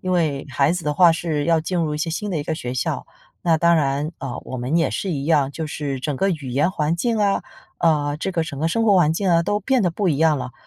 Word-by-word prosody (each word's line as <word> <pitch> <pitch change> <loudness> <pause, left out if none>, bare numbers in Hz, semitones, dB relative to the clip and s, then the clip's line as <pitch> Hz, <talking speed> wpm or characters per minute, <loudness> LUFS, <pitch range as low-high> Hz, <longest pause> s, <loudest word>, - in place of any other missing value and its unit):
因 185 0 -2
为 155 -6 0
孩 140 +3 +2
子 180 -1 -3
的 150 -1 -1
话 170 +1 +6
是 160 -3 -2
要 165 -1 +3
进 180 +3 -3
入 155 -3 0
一 - - -4
些 165 - -2
新 205 +5 -3
的 165 - -1
一 - - -2
个 160 - -2
学 125 -5 -5
校， 130 - -2 0.4
那 165 -2 +3
当 170 0 +4
然， 145 +1 0
呃， 130 -2 -5
我 130 - -5
们 125 +5 -3
也 165 - +2
是 195 - -3
一 140 -2 -3
样。 145 -4 +2
就 160 +1 -4
是 145 -3 -4
整 145 0 -2
个 195 +5 +1
语 145 -6 -4
言 140 +8 +1
环 160 0 -1
境 230 +4 0
啊， 200 -1 +1 0.3
呃， 150 -3 +1
这 190 - -3
个 165 -2 0
整 145 -4 -6
个 160 - 0
生 225 +7 0
活 210 -3 +4
环 160 -4 +4
境 190 +3 -1
啊， 170 -1 +4
都 205 +4 -1
变 260 +3 +1
得 180 - +2
不 190 +2 -1
一 150 - +1
样 155 -1 +3
了。 125 - -6
160 Hz, 305 characters per minute, -22 LUFS, 145-175 Hz, 0.4 s, 话